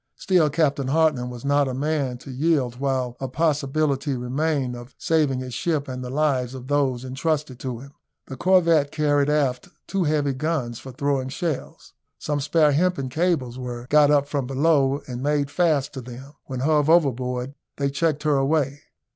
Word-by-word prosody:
Still 180 -5 +2
Captain 145 -3 +1
Hartland 145 -4 +2
was 125 +1 -9
not 145 0 +3
a 130 - -3
man 140 -3 -1
to 135 +2 -10
yield 130 -3 0
while 130 -2 -1
a 135 - -3
possibility 145 -1 0
remained 130 +1 -1
of 120 +2 -11
saving 150 -5 +1
his 130 -1 -7
ship 150 0 -1
and 130 -1 -5
the 125 - -5
lives 135 -3 0
of 130 -1 -8
those 130 -3 0
entrusted 135 0 -2
to 125 -3 -4
him. 135 +4 -12 0.3
The 135 - -8
corvette 170 -2 +3
carried 145 -2 +2
aft 140 -4 0 0.2
two 195 -3 -1
heavy 150 -2 +1
guns 135 -5 -2
for 130 - -9
throwing 135 0 -1
shells. 155 +1 -5 0.2
Some 150 -1 -2
spare 150 +1 +3
hempen 145 -3 +1
cables 135 -5 -1
were 120 -1 -6
got 150 -1 +6
up 145 -1 +3
from 140 -3 -2
below, 140 0 +2
and 125 -1 -5
made 145 0 0
fast 150 -4 +1
to 135 - -6
them; 125 +4 -10
when 130 -2 -5
hove 150 +1 +2
overboard 130 -5 +1 0.2
they 140 -1 0
checked 150 0 0
her 145 -3 +2
way. 140 -1 0
140 Hz, 175 wpm, -23 LUFS, 130-150 Hz, 0.3 s, got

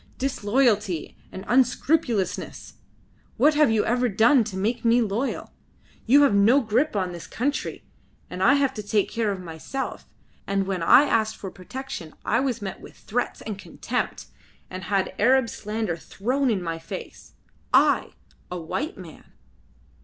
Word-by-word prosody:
"... - - -32
disloyalty 210 - 0 0.2
and 190 - -8
unscrupulousness! 250 - 0 0.6
What 305 +2 +5
have 300 -3 +4
you 220 -1 +2
ever 245 +1 +1
done 230 +5 +4
to 195 -3 -6
make 225 +5 -1
me 235 +1 +4
loyal? 230 +4 -2 0.5
You 285 +5 +7
have 280 - +4
no 210 +7 +5
grip 245 +3 0
on 185 -3 -1
this 170 -1 -8
country. 280 +5 -3 0.5
I 190 +10 +3
had 275 -2 +1
to - - -2
take 205 -1 0
care 225 -3 0
of 195 - -4
myself, 180 +10 -6 0.4
and 195 0 0
when 190 -2 -2
I 250 +11 +7
asked 220 -6 +1
for 190 - -7
protection 185 -5 -8
I - - +2
was 250 -5 -1
met 195 - -6
with - - -13
threats 245 +4 -3
and 210 -3 -6
contempt, - - -4 0.5
and 185 0 -6
had 195 -1 0
Arab 255 +2 +4
slander 210 -4 -3
thrown 255 - -1
in 200 -6 0
my 165 -1 -3
face. 165 - -9 0.4
I! - - +3 0.4
a 180 - -4
white 265 - -4
man!" 175 -5 -13
220 Hz, 155 wpm, -24 LUFS, 190-255 Hz, 0.6 s, You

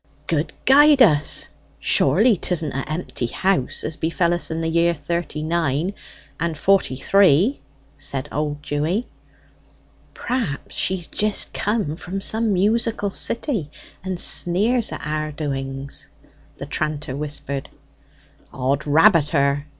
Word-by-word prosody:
"Good 155 -1 -1
guide 285 0 +7
us, 150 -8 +2 0.3
surely 205 - +3
'tisn't 165 -4 -2
a' 135 +2 -4
empty 155 -7 -3
house, 185 +2 0
as 155 0 -4
befell 170 +1 0
us 175 - -1
in 160 0 -3
the 165 - -1
year 170 +1 +2
thirty 170 -3 -4
nine 165 +2 0 0.5
and 165 -1 -2
forty 195 -5 +2
three!" 195 - +3 0.4
said 135 -2 -3
old 145 0 -3
Dewy. 155 +10 -1 1.1
"Perhaps 235 - -3
she's 185 -2 0
jist 210 +4 0
come 205 -8 -1
from 185 +3 -6
some 220 +2 0
musical 205 +1 +1
city, 225 - -2 0.3
and 185 -2 -4
sneers 215 +10 +3
at - - -6
our 155 0 -2
doings?" 135 -2 -4 0.5
the - - -6
tranter 150 -3 -3
whispered. 140 -1 -4 0.8
"'Od 135 +3 -1
rabbit 160 +1 +5
her!" 140 -1 +1
165 Hz, 125 wpm, -21 LUFS, 145-195 Hz, 1.1 s, guide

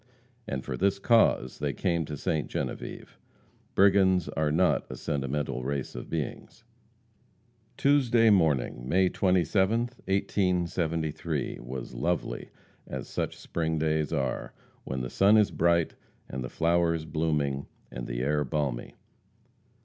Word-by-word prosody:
And 65 -10 -3
for 65 - -3
this 100 +1 +2
cause 100 - +3
they 70 -1 -1
came 85 -4 0
to 75 0 -6
Ste. 75 +2 -1
Genevieve. - - -5 0.6
Brigands 95 -3 +4
are 75 -1 0
not 90 +4 +2
a - - -5
sentimental 70 -2 -2
race 70 0 -3
of - - -7
beings. - - -5 1.1
Tuesday 120 -6 +4
morning, 70 -9 +1
May 90 +3 +3
27th, 95 +7 +1
1873, 85 -5 -1
was 65 0 -6
lovely, 85 +1 -2 0.4
as 65 -2 -5
such - - -3
spring 80 -1 -2
days 80 -1 0
are, 65 -2 -2 0.3
when 65 -1 -3
the 60 - -4
sun 100 +3 +5
is 105 -2 +4
bright, 85 -1 +2 0.3
and 65 0 -5
the 65 - -5
flowers 85 -1 +1
blooming, 75 -3 -1 0.2
and - - -6
the - - -3
air 75 +2 +1
balmy. 70 -3 -2
80 Hz, 125 wpm, -28 LUFS, 70-95 Hz, 1.1 s, sun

